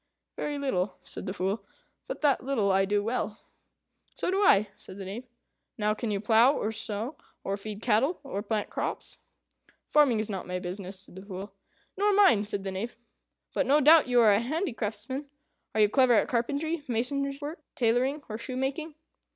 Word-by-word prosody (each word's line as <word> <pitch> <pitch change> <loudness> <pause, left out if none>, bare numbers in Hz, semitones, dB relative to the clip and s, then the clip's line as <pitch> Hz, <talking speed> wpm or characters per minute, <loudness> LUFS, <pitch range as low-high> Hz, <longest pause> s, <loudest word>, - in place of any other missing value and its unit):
"Very 295 -1 -3
little," 200 -9 -1
said - - -7
the 185 - -2
Fool; 195 +3 -2 0.4
"but - - -5
that 290 -4 +3
little 235 -7 +1
I 195 0 +3
do 205 +1 +1
well." 225 -2 -2 0.8
"So - - -1
do 385 +2 +1
I," 210 - +5
said 185 - -12
the 195 - -6
Knave. 225 +7 -6 0.5
"Now 210 -1 +1
can 220 +1 -4
you 205 -1 0
plough, 225 +5 +5
or 215 - -1
sow, 220 +4 -4 0.3
or 195 - -1
feed 210 +1 -7
cattle, 270 +11 +2
or 235 -8 -4
plant 210 0 -2
crops?" - - -4 0.7
"Farming 280 -7 +4
is 215 - -1
not 195 -3 -5
my 180 0 -2
business," 185 +1 -6
said 190 - -13
the - - -7
Fool. 195 0 -7 0.4
"Nor 410 +1 +3
mine," 380 - +5
said 205 -2 -3
the 195 - -3
Knave; 215 +6 -5 0.6
"but 280 - +1
no 290 +3 +5
doubt 305 +1 +7
you 245 -1 +4
are 220 -2 +6
a 200 - +4
handicraftsman. 260 - -3 0.5
Are 215 - +4
you 210 - +7
clever 255 +3 +4
at 225 - +4
carpentry, 290 +6 -1
mason's 275 +4 -1
work, 305 +2 -6
tailoring, 255 +5 +1
or 215 0 -5
shoemaking?" 270 +6 -3
230 Hz, 185 wpm, -28 LUFS, 205-280 Hz, 0.8 s, doubt